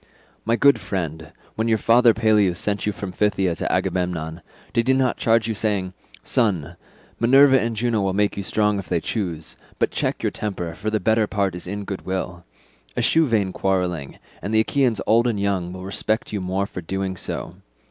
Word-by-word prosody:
"My 115 +1 +2
good 140 +3 +5
friend, 80 -5 -4 0.2
when 110 +1 -1
your 110 -1 +3
father 115 +1 +5
Peleus 105 -5 +3
sent 105 0 -1
you - - +2
from 100 -1 -6
Phthia 95 -2 +1
to - - -2
Agamemnon, 85 -2 -1 0.3
did 115 +1 +1
he 130 - +4
not 130 -2 +1
charge 115 -1 +2
you 115 - -1
saying, 100 -4 -1 0.3
'Son, 100 - 0 0.4
Minerva 135 +3 +6
and 115 0 -2
Juno 115 -1 0
will 95 -1 +1
make 105 +1 +1
you 100 - -3
strong 105 +1 +1
if 95 - -8
they 85 - +1
choose, 85 -7 -4 0.2
but - - +1
check - - -1
your - - +1
high - - -9
temper, 90 -6 -3
for 105 +6 -3
the 110 0 0
better 110 +2 +2
part 100 -3 0
is 90 0 -7
in 100 +2 -4
goodwill. 95 -3 -4 0.5
Eschew 160 -1 +3
vain 105 -6 +1
quarrelling, 90 -7 -1 0.2
and 110 +2 -2
the 110 - +6
Achaeans 120 -2 +1
old 115 +2 +4
and 110 -4 -1
young 95 -3 -1
will 95 0 -8
respect 110 +3 -2
you 105 - -2
more 95 +2 -1
for 90 - -7
doing 95 +2 -3
so. - - -6
100 Hz, 195 wpm, -22 LUFS, 90-110 Hz, 0.5 s, Minerva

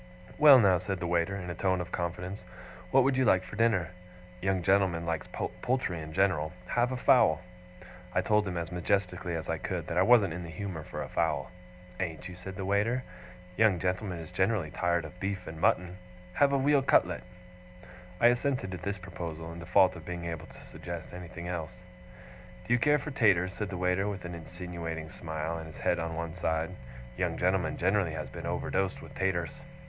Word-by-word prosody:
'Well 145 -3 +10
now,' 95 -6 +5
said 95 +1 -3
the 85 - -3
waiter, 85 +2 +1
in 90 -3 -5
a - - -3
tone 95 +1 +1
of 90 - -5
confidence, 90 +3 -4 0.5
'what 135 0 +5
would 135 +1 +2
you 130 - +4
like 95 -6 +4
for - - -9
dinner? 110 -7 +2 0.5
Young 95 -1 0
gentlemen 95 -3 +2
likes 85 -1 -2
poultry 120 -10 -2
in 80 0 -7
general: 90 -4 +1 0.2
have 120 +1 +2
a 130 - -2
fowl!' 90 -11 +5 0.7
I 90 - +2
told 105 +2 +2
him, 90 -2 -3
as 85 0 -3
majestically 90 -1 -1
as 80 -1 -4
I - - -1
could, - - -3
that 85 - -1
I - - +6
wasn't 100 -4 +5
in 90 - -5
the 85 - -7
humour 90 -1 -5
for - - -5
a - - -6
fowl. - - -1 0.5
'Ain't 90 -1 -3
you?' 90 - -8
said 95 +2 -8
the 95 -1 -4
waiter. 105 +6 +1 0.5
'Young 110 -4 +5
gentlemen 90 +1 -2
is 80 -1 -8
generally 95 -5 +1
tired 85 -1 0
of 90 +4 -11
beef 95 0 -3
and 80 0 -8
mutton: 90 0 +2 0.3
have 140 +7 +4
a 140 - +3
weal 140 +1 +4
cutlet!' 130 - +3 1.0
I - - +4
assented 120 -5 0
to 90 - -4
this 100 +3 -3
proposal, 85 -3 -6
in 85 - -8
default 90 +1 +4
of 85 - -9
being 85 +1 -5
able 85 -1 -5
to - - -14
suggest 85 -1 -7
anything 90 -1 -7
else. 90 0 -5 0.8
'Do 120 - +1
you 120 - +4
care 150 +4 +4
for 150 +1 -5
taters?' 95 -8 +3
said 105 -1 -4
the 95 - -4
waiter, 90 +2 +1
with 100 -3 -4
an 85 - -5
insinuating 85 -1 -6
smile, 80 0 -4
and 80 - -8
his 80 - -11
head - - +1
on 80 0 -3
one 85 0 -4
side. 80 -1 -1 0.5
'Young - - 0
gentlemen 90 -3 +1
generally 95 -2 +1
has - - -5
been - - -6
overdosed 95 -1 -1
with - - -11
taters. 90 -3 -1
90 Hz, 200 wpm, -30 LUFS, 85-100 Hz, 1.0 s, Well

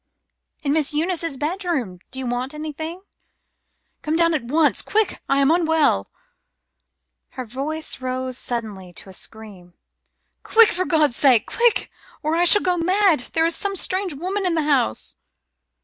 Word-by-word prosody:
"In 285 -1 0
Miss 305 -1 0
Eunice's 330 -2 -1
bedroom. 300 - -3
Do 265 - -6
you 265 - -4
want 250 +4 -3
anything?" 315 +4 -6 1.0
"Come 310 0 -2
down 335 0 +3
at 310 - 0
once. 295 +6 +2
Quick! 435 -2 0
I 275 - +2
am 275 +2 +3
unwell." 320 - +2 1.3
Her 255 - -4
voice 275 +5 -4
rose 255 0 -3
suddenly 215 -8 -5
to 190 - -7
a - - -11
scream. 195 -4 -9 0.7
"Quick! 450 -1 +6
For 365 +2 -1
God's 305 -7 +2
sake! 255 -6 +4
Quick, 475 -1 +1 0.3
or 310 +2 0
I 345 +1 +2
shall 415 +4 +8
go 360 -1 +1
mad. 370 -1 +2
There 325 0 +2
is 335 - +2
some 400 -1 -2
strange 375 -2 -2
woman 375 +7 -3
in 360 -3 0
the 320 - +1
house." 270 - 0
310 Hz, 155 wpm, -21 LUFS, 255-345 Hz, 1.3 s, shall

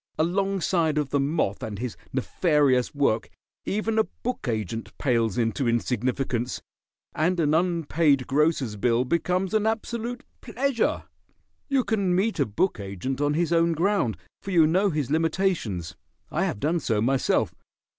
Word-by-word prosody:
Alongside 175 -2 +1
of 145 -3 -1
the 140 - +2
moth 140 -8 0
and 105 -2 -5
his 120 +1 -4 0.2
nefarious 140 -1 +1
work 140 -6 +1 0.4
even 215 +2 0
a - - +5
book 250 - -5
agent 110 -1 -3
pales 115 -6 +1
into 120 +2 0
insignificance, 125 +1 -1 0.5
and 175 +3 +1
an 150 -2 +2
unpaid 160 -5 +2
grocer's 140 -6 +1
bill 120 +3 +2
becomes 180 - 0
an 215 0 +2
absolute 235 +2 -3 0.2
pleasure. 250 0 0 0.7
You 270 -2 +2
can 200 -6 +1
meet 200 +1 0
a 140 - +2
book 110 - 0
agent 100 +8 -4
on 145 0 +1
his 170 +1 +1
own 165 0 +3
ground, 165 - +1 0.2
for - - -7
you 170 -4 +5
know 185 +6 +3
his 150 -6 -2
limitations. 160 - 0 0.4
I - - +1
have - - -3
done 160 +7 +1
so 115 -8 0
myself. 130 +4 +1
155 Hz, 145 wpm, -25 LUFS, 125-185 Hz, 0.7 s, a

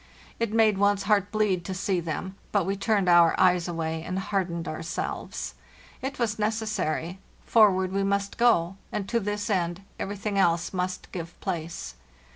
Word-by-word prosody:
It 230 -2 0
made 220 -3 +4
one's 200 0 +3
heart 205 -2 +2
bleed 210 -5 +1
to 190 - -4
see 185 0 0
them, 170 +3 -4 0.2
but 200 -4 +2
we 195 +2 0
turned 200 -1 +1
our 175 -1 +6
eyes 180 -1 +4
away 160 -1 -2
and 185 +3 -4
hardened 185 -3 -2
ourselves. 160 +1 -4 0.5
It 270 +1 -4
was 225 -3 -1
necessary; 210 -5 -1 0.3
for 215 -3 +6
ward 185 0 -1
we 195 +1 0
must 200 0 -1
go, 195 -6 +3
and 205 -2 -3
to 235 - +1
this 205 0 -2
end 180 -2 -1 0.2
everything 200 0 -2
else 170 -1 +2
must 180 0 -3
give 170 -2 -7
place. 170 - -4
190 Hz, 165 wpm, -27 LUFS, 175-210 Hz, 0.5 s, our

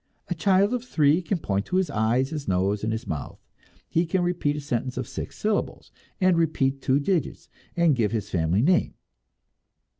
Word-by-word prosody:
A - - +1
child 195 +5 +2
of 245 -2 -2
three 155 - +2
can 180 +2 -1
point 100 -10 -2
to 185 - -2
his 190 -1 +1
eyes, 115 +5 +1
his 150 -3 -5
nose 95 +3 0
and 110 - 0
his 115 +2 -3
mouth; 75 -3 -5 0.5
he 165 +1 0
can 180 +2 +1
repeat 175 -5 0
a - - -3
sentence 130 -3 -3
of 125 -2 -3
six - - -7
syllables, 210 -1 -2 0.3
and 185 -3 +3
repeat 135 -4 0
two 130 +1 +2
digits, 155 +1 -1 0.3
and 170 -4 +4
give 110 -4 +1
his 110 -3 -3
family 90 +4 +1
name. 175 +4 +2
145 Hz, 185 wpm, -25 LUFS, 115-175 Hz, 0.5 s, and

